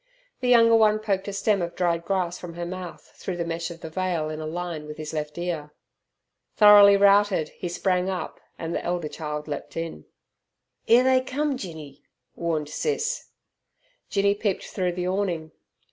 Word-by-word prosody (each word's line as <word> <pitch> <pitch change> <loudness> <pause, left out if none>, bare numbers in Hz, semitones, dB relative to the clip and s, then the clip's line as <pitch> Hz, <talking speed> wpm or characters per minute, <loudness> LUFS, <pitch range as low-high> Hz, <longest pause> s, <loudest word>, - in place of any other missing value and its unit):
The 250 - -2
younger 230 -2 +6
one 215 -1 +5
poked 200 -3 -2
a - - -2
stem 200 0 +1
of 170 0 -4
dried 170 -2 0
grass 180 -2 -1
from 170 -2 -8
her 175 0 -4
mouth 180 0 -8
through 185 -2 -5
the 170 - -2
mesh 165 0 -3
of 170 -1 -10
the 160 - -6
veil 170 -3 -1
in 155 0 -5
a 155 - -4
line 165 -2 -5
with 150 0 -8
his 155 0 -6
left 150 0 -4
ear. 165 -4 -4 0.8
Thoroughly 205 -1 +8
routed, 200 -5 +4
he 175 - -6
sprang 180 +1 0
up, 185 -3 -4 0.2
and 165 +1 -4
the - - -2
elder 175 -2 -2
child 150 0 -5
leapt 145 +1 -6
in. 165 0 -5 0.8
"'Ere 240 +2 +6
they 260 0 +4
cum, 280 +2 -1
Jinny," 155 - -8 0.3
warned 160 -3 -2
Sis. 460 - -2 0.8
Jinny 200 0 +2
peeped 205 -2 -2
through 180 -3 -2
the 180 0 -3
awning. 180 -5 -2
180 Hz, 175 wpm, -25 LUFS, 160-200 Hz, 0.8 s, Thoroughly